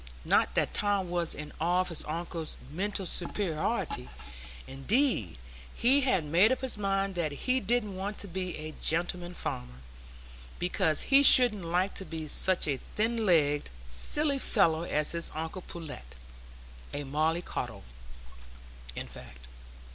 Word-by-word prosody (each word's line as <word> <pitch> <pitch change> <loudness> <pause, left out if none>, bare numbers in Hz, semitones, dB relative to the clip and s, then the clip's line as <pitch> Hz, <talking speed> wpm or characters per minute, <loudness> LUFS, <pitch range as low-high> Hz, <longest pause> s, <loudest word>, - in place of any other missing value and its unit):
Not - - +3
that - - +1
Tom 200 -3 +1
was 175 -2 0
in 150 0 -8
awe 175 +2 +3
of 185 - -2
his 170 - -3
uncle's 165 0 -4
mental 195 +4 -2
superiority; 165 - -2 0.6
indeed, 135 - 0 0.4
he 265 +4 +4
had 190 - +2
made 175 +10 +5
up 260 - 0
his 260 -2 0
mind 195 -1 0
that 170 -4 -1
he 255 - 0
didn't 215 -3 -1
want 200 +2 -4
to 200 - -6
be 185 0 -4
a 155 0 -7
gentleman 175 +2 -1
farmer, 60 - -5 0.8
because 175 -3 +1
he 275 0 +5
shouldn't 245 -9 +6
like 180 +4 0
to 190 - -4
be 160 -2 -5
such 185 +4 +2
a 140 -2 0
thin 225 - -2
legged, 150 -4 +3 0.2
silly 280 - +2
fellow 165 -11 +3
as 150 -3 +1
his 170 0 -2
uncle 160 +4 -4
Pullet,—a - - -10
molly 155 +5 0
coddle, - - -5 1.1
in - - -4
fact. 65 0 -12
175 Hz, 140 wpm, -30 LUFS, 150-200 Hz, 1.1 s, shouldn't